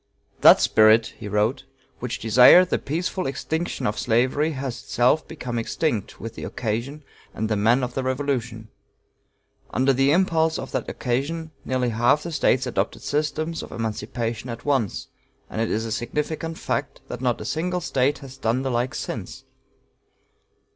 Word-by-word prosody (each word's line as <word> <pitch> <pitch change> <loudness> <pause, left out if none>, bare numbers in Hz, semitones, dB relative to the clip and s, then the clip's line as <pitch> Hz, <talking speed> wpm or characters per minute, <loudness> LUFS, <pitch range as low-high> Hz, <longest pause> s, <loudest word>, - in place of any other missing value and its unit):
"That - - +8
spirit," 110 +1 +4
he - - -6
wrote, 105 +7 0 0.3
"which 120 -1 -3
desired 125 - +7
the - - +2
peaceful 175 +4 -2
extinction 160 +5 -3
of 105 - -1
slavery 130 +7 +1
has 135 -3 -5
itself 125 +6 +2
become 125 -7 -4
extinct 115 -2 -2
with 115 0 -6
the - - -8
occasion 125 +7 -3 0.3
and 110 - -1
the 110 - 0
men 115 +5 +3
of 125 0 -3
the 135 - -1
Revolution. 130 -4 -2 1.0
Under 135 +1 +2
the 135 +2 +3
impulse 160 -2 +2
of - - -6
that - - -3
occasion, 150 +6 -2
nearly 130 -1 0
half 120 +6 +2
the 170 - -5
States 130 -4 +2
adopted 105 -4 -2
systems 155 +2 -1
of - - -9
emancipation 115 +1 -4
at 115 -1 -7
once, 135 -4 0 0.4
and 110 - -2
it 115 - 0
is 110 +1 -1
a 115 - -5
significant 150 +8 -3
fact 140 0 -3
that 125 - -6
not 125 -2 0
a 105 - -7
single 170 +7 -1
State 140 -2 +1
has 135 0 -11
done 120 +4 0
the 135 - -1
like 120 +2 -1
since. - - -6
130 Hz, 160 wpm, -24 LUFS, 115-150 Hz, 1.0 s, That